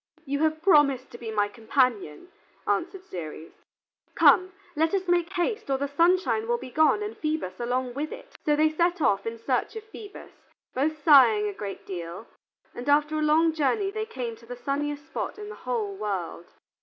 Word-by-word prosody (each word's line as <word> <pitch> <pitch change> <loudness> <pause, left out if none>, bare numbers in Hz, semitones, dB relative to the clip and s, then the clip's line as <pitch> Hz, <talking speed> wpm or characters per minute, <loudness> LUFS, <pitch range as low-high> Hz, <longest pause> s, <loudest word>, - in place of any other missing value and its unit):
"You 280 0 -2
have 315 +1 0
promised 280 -8 +4
to 240 - -10
be 230 - -6
my 210 -2 +1
companion," 225 - -1 0.4
answered 365 +2 -1
Ceres. 165 - -8 0.6
"Come, 370 +1 +5 0.2
let 320 +4 +2
us 380 -1 -2
make 350 0 +2
haste, 425 +1 -2
or 270 - +2
the 280 +1 -2
sunshine 360 +9 +2
will 475 0 +1
be 255 - -9
gone 315 - +3
and 420 +1 -5
Phoebus 310 - -3
along 245 +1 -1
with 295 +4 -4
it." - - -11
So 295 - +3
they 310 +1 +3
set 345 +3 +1
off 205 -7 +1
in 230 0 -4
search 250 - -1
of 445 - -6
Phoebus, 435 -1 -11 0.4
both 295 +3 -1
sighing 240 -9 +6
a 205 - -3
great 200 0 -7
deal, 175 +2 -6 0.5
and 245 +4 -5
after 300 +1 +3
a - - -1
long 315 +2 +3
journey 390 +7 0
they 435 +1 -4
came 245 - -5
to 230 - -18
the 245 - -6
sunniest 290 +3 -3
spot 320 - -5
in 420 0 -8
the 435 - -8
whole 220 -5 -1
world. 190 -4 -4
290 Hz, 190 wpm, -26 LUFS, 235-345 Hz, 0.6 s, sighing